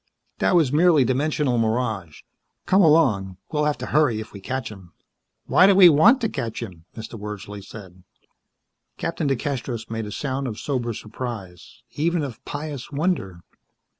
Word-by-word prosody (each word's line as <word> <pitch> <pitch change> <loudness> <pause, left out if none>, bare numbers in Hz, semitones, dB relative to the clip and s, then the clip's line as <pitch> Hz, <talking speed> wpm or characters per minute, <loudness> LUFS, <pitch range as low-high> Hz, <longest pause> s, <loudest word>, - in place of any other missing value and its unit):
"That - - +2
was 155 -6 +3
merely 160 -2 +5
dimensional 135 -1 0
mirage. 110 -8 -2 0.4
Come 190 +2 +4
along. 125 - +3
We'll 150 -1 0
have 150 -1 0
to - - -5
hurry 140 -7 +2
if 110 - -9
we 100 - -8
catch 125 +3 -4
him." 95 -5 -13 0.5
"Why 185 - +5
do 200 - +5
we 185 -2 +9
want 215 - +5
to 225 - +1
catch 115 -2 -4
him?" 85 -3 -10
Mr. 110 0 -8
Wordsley 105 -1 -7
said. 95 -3 -12 1.0
Captain 165 -2 -2
DeCastros 125 -4 -3
made 110 -1 -3
a - - -7
sound 135 +2 -3
of 110 -3 -5
sober 120 -5 -2
surprise. 110 -3 -8
Even 165 +3 0
of 130 -6 -7
pious 145 -3 -6
wonder. 140 - -2
125 Hz, 160 wpm, -23 LUFS, 105-150 Hz, 1.0 s, we